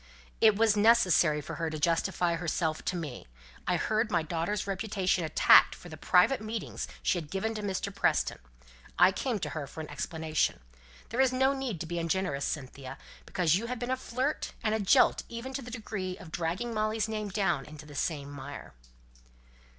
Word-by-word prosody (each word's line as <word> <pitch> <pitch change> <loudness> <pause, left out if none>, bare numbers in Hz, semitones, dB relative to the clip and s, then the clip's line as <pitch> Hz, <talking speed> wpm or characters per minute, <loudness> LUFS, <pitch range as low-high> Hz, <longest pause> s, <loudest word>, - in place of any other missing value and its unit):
"It 220 -2 +6
was 220 0 +3
necessary 205 -9 +4
for 145 - -7
her 165 -1 -1
to 155 - -4
justify 170 +2 +1
herself 165 -1 -1
to 180 - -1
me 150 - -6 0.4
I 180 - +2
heard 220 +6 0
my 170 -5 +1
daughter's 170 +5 -2
reputation 195 -2 0
attacked 160 - +6
for 175 - -12
the 155 - -8
private 180 - +3
meetings 215 0 -4 0.2
she 180 - +2
had 155 -3 -9
given 195 +5 -2
to 215 - -4
Mr. 200 0 -3
Preston 195 - +1 0.6
I - - +7
came 240 +3 -2
to 195 - -4
her 150 -3 -5
for 150 - -10
an 155 -1 -6
explanation. 160 - -1 0.5
There's 255 +3 +3
no 265 +2 +3
need 265 - -3
to - - -3
be 170 +1 -3
ungenerous, 165 -4 -1
Cynthia, 135 -2 -5 0.3
because 175 -4 +2
you've 235 +4 -4
been 245 +2 -3
a - - +3
flirt 260 +3 -2
and 215 - +1
a 220 - +1
jilt, 220 +6 +4
even 235 +3 -6
to 270 - -3
the 245 - -9
degree 210 -6 -5
of 160 - -12
dragging 175 +9 -2
Molly's 215 0 0
name 215 -1 -3
down 190 -8 0
into 150 0 -11
the 150 - -12
same 145 -1 -2
mire." 145 - -8
185 Hz, 185 wpm, -30 LUFS, 160-220 Hz, 0.6 s, I